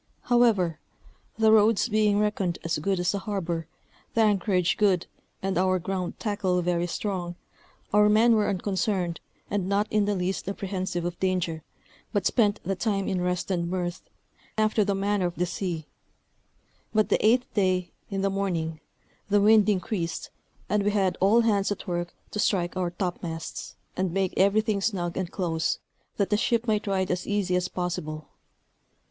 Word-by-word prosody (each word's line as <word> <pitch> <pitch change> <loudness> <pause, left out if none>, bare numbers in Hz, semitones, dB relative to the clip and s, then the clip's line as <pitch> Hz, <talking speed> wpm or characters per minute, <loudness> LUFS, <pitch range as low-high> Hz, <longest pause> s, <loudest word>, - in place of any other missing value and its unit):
However, 220 -10 +3 0.6
the 220 -1 +5
Roads 220 +1 +5
being 210 -2 +2
reckoned 205 -4 0
as 165 -2 -1
good 190 +4 0
as 180 +2 +1
a 200 - -1
harbor, 175 -6 -3 0.5
the 230 - +4
anchorage 195 -4 +2
good, 195 -5 +2 0.4
and 190 -2 0
our 185 0 +3
ground 185 0 -3
tackle 205 -4 0
very 175 0 0
strong, 175 -2 -3 0.6
our 210 0 +6
men 225 +3 +5
were 215 -2 +2
unconcerned, 190 -2 -1 0.3
and 195 -2 -1
not 200 +1 +2
in 210 -1 +3
the 205 0 0
least 185 +1 -2
apprehensive 185 -3 -3
of 175 0 -4
danger, 180 -4 0 0.5
but 205 -3 0
spent 210 -4 +2
the 195 +2 -1
time 195 0 -1
in 185 -1 0
rest 180 +1 -1
and 170 -2 0
mirth, 175 -1 -3 0.5
after 215 0 +3
the 200 0 0
manner 200 -1 +1
of 175 - -6
the 180 - 0
sea; 170 -2 -3 1.1
but 215 -1 +3
the - - +2
eighth 245 +3 +3
day, 185 -3 +1 0.2
in 195 -2 -2
the 195 0 +1
morning, 170 -5 -2 0.5
the 205 0 +4
wind 215 0 +5
increased, 180 -3 -2 0.4
and 210 0 +1
we 205 - +2
had 195 -3 +1
all 210 +5 +5
hands 205 -3 +2
at 205 - -4
work 175 -1 -2 0.2
to 210 - -4
strike 180 -4 +1
our 180 -2 0
topmasts, 175 -2 -5 0.2
and 185 -1 0
make 190 0 0
everything 205 +1 +2
snug 180 -5 -1
and 185 -2 -2
close, 165 -4 -1 0.4
that 200 0 0
the 210 - +4
ship 230 +2 +1
might 215 -2 0
ride 190 -1 0
as 180 0 -2
easy 200 -3 0
as 180 0 +1
possible. 155 -4 -4
190 Hz, 165 wpm, -26 LUFS, 180-205 Hz, 1.1 s, our